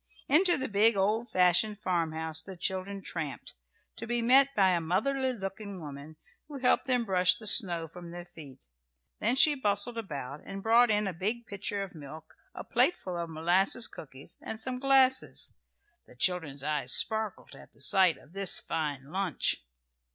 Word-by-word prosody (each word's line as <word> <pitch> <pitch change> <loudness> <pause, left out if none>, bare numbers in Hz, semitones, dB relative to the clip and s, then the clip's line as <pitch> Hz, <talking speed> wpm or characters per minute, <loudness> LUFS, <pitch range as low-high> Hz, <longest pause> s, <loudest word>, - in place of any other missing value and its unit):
Into 350 +5 +5
the 265 -1 -2
big 215 +1 +3
old 215 +5 0
fashioned 185 +4 +3
farmhouse 160 -3 -1
the 190 +1 -9
children 190 +2 -3
tramped, 155 -6 -6 0.4
to 230 +1 -7
be 240 +1 -1
met 270 +4 +4
by 195 -2 +4
a 175 -2 0
motherly 260 +11 0
looking 200 -3 -7
woman, 145 0 -10 0.3
who 295 -2 -8
helped 255 +1 +1
them 250 -2 +1
brush 180 -2 +4
the 215 - -11
snow 175 -7 +3
from 175 +2 -11
their 175 0 -9
feet. 145 - -14 0.5
Then 250 - +1
she 295 +3 +6
bustled 230 -2 0
about, 145 - -7
and 195 0 -8
brought 235 +2 +4
in 210 0 +2
a 195 - -3
big 215 +7 -3
pitcher 200 -1 -4
of 195 - -9
milk, 155 0 -12 0.2
a - - -7
plateful 185 - +1
of 170 -1 -4
molasses 175 +8 +1
cookies, 135 -2 -11
and 220 - -7
some 255 0 -4
glasses. 265 -1 +2 0.5
The - - -18
children's 145 -2 -1
eyes 150 -1 -2
sparkled 220 -2 +1
at - - -15
the - - -22
sight 190 -4 +3
of 155 - -20
this 195 -2 +2
fine 145 -3 -4
lunch. 185 - -1
195 Hz, 170 wpm, -29 LUFS, 165-230 Hz, 0.5 s, she